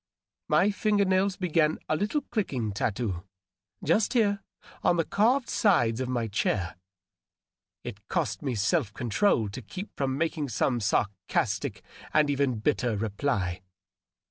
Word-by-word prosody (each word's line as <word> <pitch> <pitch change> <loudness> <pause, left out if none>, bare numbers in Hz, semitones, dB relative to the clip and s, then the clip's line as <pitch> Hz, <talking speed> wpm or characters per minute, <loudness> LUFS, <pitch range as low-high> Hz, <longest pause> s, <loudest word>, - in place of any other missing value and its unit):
My 195 +4 +4
finger 205 -1 +2
nails 190 0 +2
began 165 -4 +2
a 155 - +1
little 210 - 0
clicking 130 - -2
tattoo, 100 -2 -2 0.6
just 205 - +2
here, 205 -5 +2 0.4
on 175 - +3
the 165 - +1
carv^ 240 +5 +2
sides 120 - +2
of 130 - -2
my 120 -3 -1
chair; 100 -4 -1 1.1
it 100 -4 -8
cost 100 -2 -1
me 130 -4 -2
self 110 - +1
control 120 - +2
tx) 105 +2 -8
keep 195 +2 -7
from 135 -1 -1
making 160 -2 -1
some 120 +1 +1
sarcastic 100 -1 -1 0.3
and 150 -2 +4
even 140 -4 +1
bitter 120 -3 +1
reply. 100 -4 -1
140 Hz, 135 wpm, -28 LUFS, -, 1.1 s, My